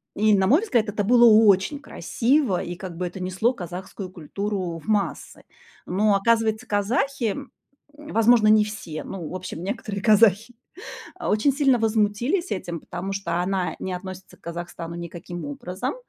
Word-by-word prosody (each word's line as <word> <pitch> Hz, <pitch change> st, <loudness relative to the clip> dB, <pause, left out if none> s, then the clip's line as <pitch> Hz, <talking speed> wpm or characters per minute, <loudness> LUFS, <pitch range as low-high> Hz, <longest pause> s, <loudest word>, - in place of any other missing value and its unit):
И, 215 Hz, 0 st, +4 dB
на 190 Hz, 0 st, +2 dB
мой 290 Hz, -, +5 dB
взгляд, 240 Hz, -, +1 dB
это 205 Hz, 0 st, -1 dB
было 240 Hz, +3 st, +6 dB
очень 215 Hz, +4 st, +5 dB
красиво, 260 Hz, -5 st, 0 dB
и 175 Hz, -, -5 dB
как 180 Hz, -2 st, -8 dB
бы 180 Hz, -, -2 dB
это 175 Hz, +2 st, -8 dB
несло 190 Hz, +7 st, 0 dB
казахскую 185 Hz, 0 st, -7 dB
культуру 185 Hz, 0 st, -4 dB
в -, -, -17 dB
массы. 210 Hz, -2 st, -2 dB, 0.4 s
Но, 200 Hz, +2 st, +2 dB
оказывается, 220 Hz, +1 st, +1 dB
казахи, 225 Hz, +3 st, 0 dB
м, 280 Hz, -2 st, -8 dB, 0.4 s
возможно, 240 Hz, -7 st, +3 dB
не 215 Hz, 0 st, +6 dB
все, 175 Hz, -7 st, -6 dB
но, 180 Hz, -5 st, -6 dB
в -, -, -6 dB
общем, 180 Hz, -2 st, -6 dB
некоторые 200 Hz, 0 st, -4 dB
казахи, 220 Hz, +1 st, +4 dB, 0.6 s
а, -, -, -4 dB
очень 215 Hz, +7 st, +3 dB
сильно 270 Hz, -4 st, +3 dB
возмутились 225 Hz, -, 0 dB
этим, 175 Hz, -3 st, -3 dB
потому 195 Hz, +2 st, -5 dB
что 175 Hz, -3 st, -2 dB
она 185 Hz, 0 st, -1 dB
не 185 Hz, -, -4 dB
относится 185 Hz, +1 st, -8 dB
к -, -, -40 dB
Казахстану 170 Hz, 0 st, -6 dB
никаким 170 Hz, -1 st, -7 dB
образом. 180 Hz, -, -4 dB
200 Hz, 160 wpm, -24 LUFS, 180-225 Hz, 0.6 s, было